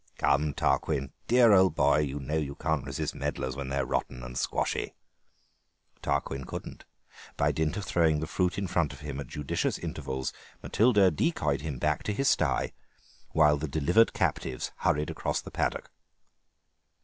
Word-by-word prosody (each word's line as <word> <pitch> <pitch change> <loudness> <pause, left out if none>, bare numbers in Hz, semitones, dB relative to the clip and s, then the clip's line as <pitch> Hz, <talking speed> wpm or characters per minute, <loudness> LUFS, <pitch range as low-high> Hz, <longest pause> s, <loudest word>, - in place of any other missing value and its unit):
"Come, 70 0 +2
Tarquin, 70 -3 0 0.2
dear 120 -3 +6
old 95 -1 +5
boy; 75 - +4
you 75 -1 -1
know 70 +3 -3
you 70 -3 -2
can't 80 -4 -1
resist - - -3
medlars 65 -1 -3
when 70 0 -5
they're 70 -1 0
rotten 60 -1 -2
and 60 +1 -8
squashy." - - -1 1.1
Tarquin 70 0 -1
couldn't. - - -8 0.5
By - - +3
dint 80 +2 -1
of 105 - -4
throwing 80 -3 +2
the 80 - -2
fruit 90 +2 0
in 100 - -1
front 85 -5 0
of - - -12
him 70 -2 -5
at 70 - -6
judicious 75 +1 -2
intervals 65 -1 -4 0.3
Matilda 105 -5 +4
decoyed 75 - 0
him 75 -4 -4
back - - 0
to 105 - 0
his 135 +6 0
stye, - - +1 0.6
while 75 -2 +5
the 75 +2 -3
delivered 80 +10 +3
captives 65 - -1
hurried 75 +1 +1
across - - -2
the - - -9
paddock. - - -2
75 Hz, 160 wpm, -29 LUFS, 70-90 Hz, 1.1 s, dear